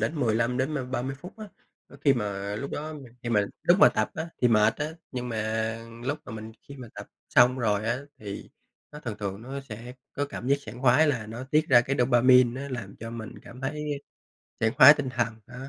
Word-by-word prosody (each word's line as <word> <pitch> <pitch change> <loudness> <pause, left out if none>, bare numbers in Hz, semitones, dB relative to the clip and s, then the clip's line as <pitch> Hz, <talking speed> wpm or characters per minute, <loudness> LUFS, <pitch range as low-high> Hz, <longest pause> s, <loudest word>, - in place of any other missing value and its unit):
đến 115 +9 -1
15 115 +1 +1
đến, 140 +4 0
ơ, 135 -3 -2
30 130 +1 -3
phút 180 +6 -11
á. 215 - -7 0.6
Khi 140 - +6
mà 100 -3 -3
lúc 140 - -5
đó 155 +1 -5 0.3
khi 120 - -4
mà 105 -3 +3 0.2
lúc 180 +3 +4
mà - - +9
tập 110 0 -1
á, 160 +1 -3 0.2
thì 125 - +6
mệt 105 -2 +4
á, 150 - -2 0.3
nhưng 125 -1 -4
mà 110 0 -1 0.3
lúc 145 +3 -1
mà - - -9
mình 110 0 -8 0.2
khi 140 - -9
mà 125 -3 -9
tập - - -8 0.2
xong 125 +2 +5
rồi 105 -3 0
á, 120 +2 0 0.2
thì, 100 -2 -8 0.4
nó 150 - -9
thường 115 -7 -5
thường 100 +1 -4
nó 135 +3 -6
sẽ 120 -1 -9 0.2
có 145 - -1
cảm 125 - -7
giác 140 - +4
sảng 120 +5 -9
khoái 135 +5 +5
là 115 -7 -1
nó 115 +4 -7
tiết 155 +3 +1
ra 120 -3 +7
cái 135 +3 -2
dopamine, 125 0 +5
nó 140 - -5
làm 100 -1 -11
cho 115 +1 -7
mình 115 -2 -7
cảm 125 +2 -12
thấy 145 +1 -3 0.6
sảng 115 +1 +1
khoái 140 +3 +10
tinh 145 -3 -3
thần 120 -3 -1
đó. 125 - -12
125 Hz, 225 wpm, -27 LUFS, 110-140 Hz, 0.6 s, khoái